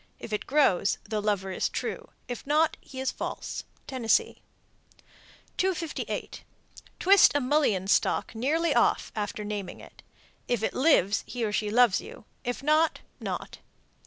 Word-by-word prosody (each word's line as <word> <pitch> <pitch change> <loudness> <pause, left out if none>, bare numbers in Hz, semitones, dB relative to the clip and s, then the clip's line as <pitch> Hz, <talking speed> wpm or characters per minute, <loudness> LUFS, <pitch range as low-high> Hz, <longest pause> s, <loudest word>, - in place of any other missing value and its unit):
If 220 - -8
it 210 - -3
grows, 260 -9 +3
the 215 0 -3
lover 200 -2 -1
is - - -1
true; - - -4 0.2
if 245 -2 -5
not, 305 +2 +3
he 265 - -10
is 265 0 0
false. - - -5 0.2
Tennessee. 255 -4 0 1.2
258. 355 -4 -2 0.6
Twist 395 +2 +7
a - - +4
mullein 255 -9 +1
stalk 200 - +1
nearly 295 +7 +1
off 240 - +2
after 210 0 -3
naming 205 -3 -5
it. - - -15 0.5
If 240 -3 0
it - - 0
lives, 230 - +3
he 240 -2 -2
or 210 - -2
she 210 0 -1
loves 235 -2 +4
you; - - -12 0.2
if 245 +1 -4
not, 310 +2 +2 0.2
not. - - -5
245 Hz, 145 wpm, -27 LUFS, 210-295 Hz, 1.2 s, Twist